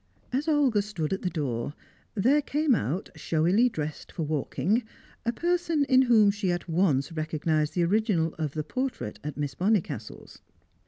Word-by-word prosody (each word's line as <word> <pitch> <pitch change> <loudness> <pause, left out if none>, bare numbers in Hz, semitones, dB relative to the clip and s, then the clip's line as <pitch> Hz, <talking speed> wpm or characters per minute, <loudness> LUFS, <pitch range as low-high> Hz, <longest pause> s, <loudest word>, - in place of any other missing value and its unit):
As 280 +5 0
Olga 280 -9 +3
stood 190 -6 -3
at 190 - -2
the 180 - -1
door, 140 -4 -3 0.4
there 260 +9 +3
came 295 0 +1
out, 170 - -1
showily 180 +10 +2
dressed 155 -7 -5
for 165 - -3
walking, 155 - 0 0.5
a - - +4
person 340 +1 +1
in 260 -2 +5
whom 225 -5 +5
she 200 -2 -1
at 175 0 -3
once 165 -4 +1
recognised 155 -1 -1
the 175 - +2
original 180 -4 +1
of 150 -3 -2
the 155 - -2
portrait 255 - -4
at 150 -1 -5
Miss 145 -2 -2
Bonnicastle's. 165 - -2
185 Hz, 160 wpm, -27 LUFS, 155-240 Hz, 0.5 s, in